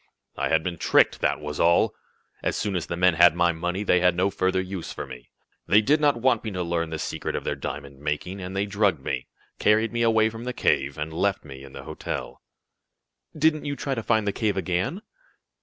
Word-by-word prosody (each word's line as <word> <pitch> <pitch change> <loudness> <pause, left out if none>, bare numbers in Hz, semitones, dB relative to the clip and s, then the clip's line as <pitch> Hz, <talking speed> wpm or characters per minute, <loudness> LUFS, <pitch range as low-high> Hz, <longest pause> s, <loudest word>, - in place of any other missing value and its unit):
"I - - -1
had 80 0 +2
been 85 -2 -4
tricked, - - +3
that - - +1
was 75 -1 -6
all! 85 +1 +4 0.5
As - - -1
soon 100 -2 -2
as 85 -3 -2
the 85 - -4
men 90 0 +4
had 85 0 +6
my 85 0 +3
money 90 +4 -3
they 90 -3 +3
had 90 -1 +3
no 95 +3 +1
further 95 0 +1
use 95 -1 -5
for - - -6
me. - - -11 0.4
They 100 +4 +6
did 145 +8 +2
not 145 -4 +3
want 120 -1 +2
me 110 - -3
to 90 -3 -3
learn 85 -1 -1
the 80 - -4
secret - - -4
of - - -3
their - - -1
diamond 70 -1 -7
making, 75 +6 -3
and 90 +1 -6
they 100 +1 +1
drugged 100 -8 0
me, - - -3 0.3
carried 110 +2 +3
me 120 - -1
away 110 -1 +3
from 115 +1 -8
the 125 - -3
cave, 70 - +1
and 75 +1 -4
left 100 +2 0
me 70 -2 -10
in 70 - -12
the - - -8
hotel." 80 +1 -6 1.0
"Didn't 155 0 +2
you 145 -1 -2
try 140 -1 -3
to 115 - -2
find 110 -1 +1
the 100 - +1
cave 105 -4 0
again?" 95 - -1
95 Hz, 225 wpm, -25 LUFS, 80-110 Hz, 1.0 s, had